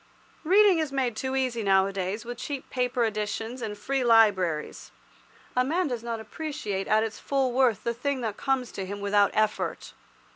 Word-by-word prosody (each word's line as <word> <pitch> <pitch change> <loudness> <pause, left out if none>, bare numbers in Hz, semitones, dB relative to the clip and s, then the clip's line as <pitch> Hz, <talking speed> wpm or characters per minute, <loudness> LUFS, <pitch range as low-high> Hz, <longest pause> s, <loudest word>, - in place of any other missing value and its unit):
Reading 385 +1 +5
is 310 -3 -1
made 260 -4 -1
too 260 +4 -3
easy 255 -3 0
nowadays, 195 +1 +1
with 240 0 -6
cheap 275 0 -6
paper 250 -1 0
editions 220 +3 -3
and 210 -2 -4
free 270 +5 -1
libraries. 200 -9 +2 0.6
A 250 - +3
man 335 +6 0
does 245 -4 -3
not 230 -1 -4
appreciate 220 -5 -4
at 215 +1 +3
its 220 -1 -5
full 270 -2 0
worth 250 -5 +2
the 235 - -1
thing 265 +2 -2
that 220 -3 -3
comes 265 -3 -1
to 195 - -5
him 200 +1 -5
without 200 0 +3
effort. 215 -1 -1
235 Hz, 175 wpm, -27 LUFS, 210-265 Hz, 0.6 s, Reading